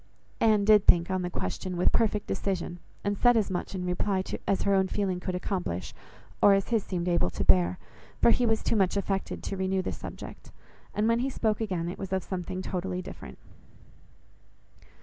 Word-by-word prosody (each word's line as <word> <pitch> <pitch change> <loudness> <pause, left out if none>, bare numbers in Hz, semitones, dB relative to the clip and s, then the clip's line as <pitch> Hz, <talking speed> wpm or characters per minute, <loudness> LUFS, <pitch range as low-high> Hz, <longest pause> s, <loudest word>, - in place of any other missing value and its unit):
Anne 215 -3 +4
did 210 -1 +5
think 170 +1 +5
on 185 -1 0
the 180 - -2
question 180 - -4
with 180 - +3
perfect 210 -2 +1
decision, 175 -2 -3 0.2
and 205 0 0
said 245 -1 +5
as 205 -3 +1
much 180 +1 -3
in 180 -1 -3
reply 185 +2 0 0.2
as 195 - +1
her 200 - +2
own 190 -1 +3
feeling 190 -2 -1
could 180 0 -3
accomplish, 180 - -3 0.5
or 200 - +7
as 195 - -1
his 225 -4 +1
seemed 180 -2 -3
able 170 - +2
to - - -3
bear, 90 0 +4 0.4
for - - +6
he 250 - +2
was 225 -2 +1
too - - +1
much 195 -1 +2
affected 195 -1 -2
to - - -3
renew 190 0 0
the - - -2
subject, - - -9 0.4
and 210 +1 +2
when 230 0 +3
he 260 +2 0
spoke 220 -4 -1
again, 185 -6 -2
it 175 - -6
was 195 -1 -6
of 190 -2 0
something 185 0 -4
totally 185 -1 -3
different. - - -10
190 Hz, 195 wpm, -28 LUFS, 180-205 Hz, 0.5 s, or